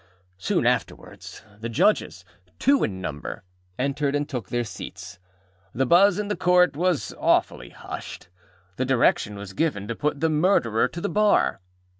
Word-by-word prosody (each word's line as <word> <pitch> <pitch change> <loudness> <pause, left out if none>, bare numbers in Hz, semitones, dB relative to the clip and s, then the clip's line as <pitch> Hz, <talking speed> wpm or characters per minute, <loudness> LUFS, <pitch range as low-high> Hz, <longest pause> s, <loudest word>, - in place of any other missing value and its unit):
Soon - - 0
afterwards - - -3 0.2
the 115 +2 -5
Judges, 165 - +1 0.3
two 280 0 +3
in 95 -2 -3
number, 75 -5 -6 0.3
entered, 140 +2 -1
and 145 0 -1
took 125 -10 -5
their 120 0 -1
seats. 105 - -9 0.6
The 135 +2 +1
buzz 180 +6 +5
in 210 -1 -2
the 205 - -1
Court 180 -3 +3
was 160 - 0
awfully - - +1
hushed. - - -9 0.5
The 130 - 0
direction 125 -5 +2
was 100 -1 -8
given 105 -8 -1
to 115 - -3
put 150 +2 -2
the 160 - +2
Murderer 150 - +2
to 170 - -8
the 205 - -1
bar. 210 - +2
140 Hz, 155 wpm, -24 LUFS, 110-180 Hz, 0.6 s, buzz